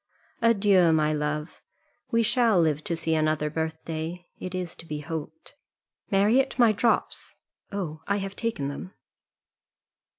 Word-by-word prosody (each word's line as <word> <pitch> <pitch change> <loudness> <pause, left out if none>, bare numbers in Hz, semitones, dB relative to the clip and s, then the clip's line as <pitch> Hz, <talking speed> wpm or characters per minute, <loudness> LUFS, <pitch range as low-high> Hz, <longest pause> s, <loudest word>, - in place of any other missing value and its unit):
Adieu! 200 -6 +4
my 155 -1 +2
love: 150 +1 -3 0.5
we 230 0 +2
shall 230 -4 +3
live 155 -2 +1
to 170 - -2
see 160 0 -1
another 155 -1 +1
birthday, 160 +2 -4
it 185 0 -5
is 180 -2 -3
to 165 - -12
be 150 -1 -4
hoped. 160 +1 -7 0.6
Marriott, 220 +8 +3
my 235 -3 +6
drops. 220 +3 0 0.4
Oh, 170 -6 -4
I 200 - +1
have 195 0 -4
taken 225 -12 -2
them." 145 +7 -7
170 Hz, 135 wpm, -26 LUFS, 155-200 Hz, 0.6 s, my